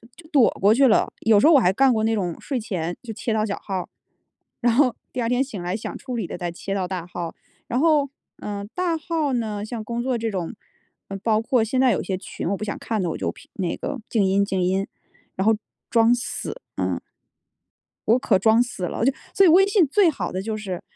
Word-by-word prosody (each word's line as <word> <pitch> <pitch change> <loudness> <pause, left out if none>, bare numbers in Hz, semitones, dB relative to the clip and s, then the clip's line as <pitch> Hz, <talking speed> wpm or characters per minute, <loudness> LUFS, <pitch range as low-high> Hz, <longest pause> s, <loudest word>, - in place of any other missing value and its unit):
就 345 - -15
就 310 - -18
躲 275 -8 +5
过 200 +3 +6
去 270 +3 +5
了， 220 - +3
有 220 -2 +5
时 290 - +5
候 330 - +7
我 280 - +8
还 185 -6 +3
干 265 +4 +4
过 220 -1 0
那 225 0 +2
种 180 -5 -2
睡 270 -3 -3
前 175 -6 -3
就 230 - -6
切 225 +1 -2
到 215 -1 +1
小 200 - -3
号， 190 -3 -4 0.7
然 240 -1 +3
后 255 0 +3 0.2
第 250 - -2
二 230 - 0
天 250 +2 +2
醒 225 -9 -7
来 175 +2 -2
想 215 - -5
处 255 -2 -6
理 220 -6 -2
的 - - -6
再 175 -1 -3
切 195 +3 -5
到 190 -2 -1
大 180 -2 -4
号， 175 -1 -6 0.3
然 245 - 0
后， 300 -2 +4 0.3
呃， 205 -1 -5
大 360 -2 0
号 315 -3 -1
呢， 215 -4 -2
像 225 0 -5
工 235 +2 -3
作 260 -1 0
这 225 0 -2
种， 185 0 -3 0.6
呃， 195 - -4
包 220 -2 +2
括 230 0 +2
现 255 +4 0
在 260 -2 +5
有 205 - 0
些 190 - -2
群 - - -6
我 200 - +1
不 - - -6
想 205 - -3
看 220 -3 -2
的， 175 - -1
我 - - -3
就 - - -2
屏 - - -17
那 180 -3 -2
个 285 -3 -4
静 220 -4 +2
音 195 +1 +3
静 190 -2 -1
音， 190 +2 0 0.5
然 190 - -1
后 220 - +5 0.4
装 230 0 +5
死， 245 - -5 0.2
嗯。 - - -1 1.1
我 230 +3 +5
可 205 -6 +2
装 220 +4 +5
死 245 -7 -5
了， 195 - -2
就 270 - +4 0.2
所 390 - +6
以 - - +7
微 370 +4 +7
信 395 -4 +4
最 355 +7 +4
好 300 - -4
的 185 - -2
就 215 +2 -3
是， 190 -5 -5
225 Hz, 260 characters per minute, -23 LUFS, 195-255 Hz, 1.1 s, 我